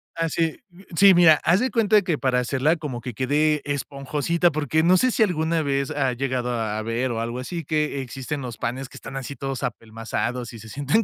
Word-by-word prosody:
así, 165 -1 -1
mm, 175 +2 -17 0.2
sí, 195 -1 +8
mira, 165 -3 +6
haz 175 +4 +4
de 255 +1 +1
cuenta 215 -2 +4
que 170 -5 0
para 125 -2 +1
hacerla 135 +6 +1
como 130 -6 -5
que 125 -1 -6
quede 150 +5 +1
esponjosita, 145 +4 0
porque, 155 +1 0
no 180 +3 +5
sé 255 +4 +3
si 220 - +3
alguna 165 -3 0
vez 140 0 -1
has 135 -4 0
llegado 125 -1 -2
a 110 -2 -2
ver 115 +3 -1
o 115 - -2
algo 120 +2 -3
así 165 +4 -5
que 150 -3 -1
existen 135 +3 -5
los 125 -3 -6
panes 125 +3 -3
que - - -17
están 135 - -8
así 135 +1 -6
todos 135 -2 -4
apelmazados 120 +1 -4
y 115 - -9
se 110 - -11
sienten 145 - +1
140 Hz, 210 wpm, -24 LUFS, 125-160 Hz, 0.2 s, sí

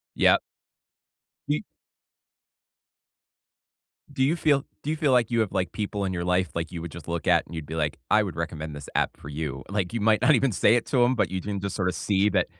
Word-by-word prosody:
Yep. - - +5 1.1
Y 75 - 0 2.5
Do 135 - -1
you 155 +5 +2
feel 145 -4 +2 0.2
do 150 - -3
you 155 - 0
feel 150 -4 +2
like 120 -2 +3
you 115 -1 +2
have, 105 -4 0
like, 95 -2 -1
people 105 -1 -3
in 95 - -1
your 85 -1 -2
life, 90 +1 +1
like, 85 0 -3
you 85 - -6
would 85 -1 -7
just 85 -1 -10
look 85 -1 -3
at - - +4
and - - -12
you'd 80 -3 -5
be, 80 - -6
like, 75 -2 -1
"I 110 - +5
would 95 -7 -5
recommend 80 -2 -4
this 70 - -9
app - - 0
for 70 - -11
you." 70 -2 -4
Like, 100 -3 -2
you 115 - -2
might 105 0 +3
not 140 +3 +6
even 130 -1 +2
say 115 - +4
it 120 - -1
to 125 -2 +3
'em, 125 - +3
but 90 - +1
you 95 - -1
can 100 -1 -3
just 100 0 -3
sorta 90 -2 0
see 100 0 +1
that 90 -3 +2
95 Hz, 235 wpm, -26 LUFS, 85-115 Hz, 2.5 s, not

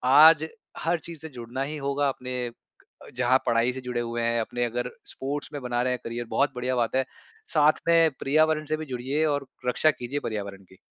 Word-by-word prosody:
आज 160 +1 +8 0.3
हर 170 +1 +1
चीज़ 165 0 -9
से 160 - -6
जुड़ना 125 -1 -6
ही 150 +2 -4
होगा 140 0 0
अपने 125 -1 -4 0.6
अ, - - -12
जहाँ 125 +1 +4
पढ़ाई 115 +2 +3
से 130 - -6
जुड़े 125 -1 -2
हुए 120 0 -3
हैं, 115 0 +1
अपने 120 +2 -2
अगर 125 +1 -2 0.2
स्पोर्ट्स 145 +2 -4
में 145 - -4
बना 120 -1 -1
रहे 125 0 +1
हैं 125 - -3
करियर, 120 +1 -4
बहुत 140 +3 +2
बढ़िया 125 +1 -1
बात 120 0 0
है। 130 - +3 0.5
साथ 150 +1 +4
में 165 -1 +5
पर्यावरण 155 +2 +2
से 155 +1 -1
भी 155 - -5
जुड़िए 135 +3 -1
और 145 -3 0 0.2
रक्षा 155 +5 +4
कीजिए 135 +1 -4
पर्यावरण 100 -3 -4
की। 95 0 -20
130 Hz, 210 wpm, -26 LUFS, 120-150 Hz, 0.6 s, आज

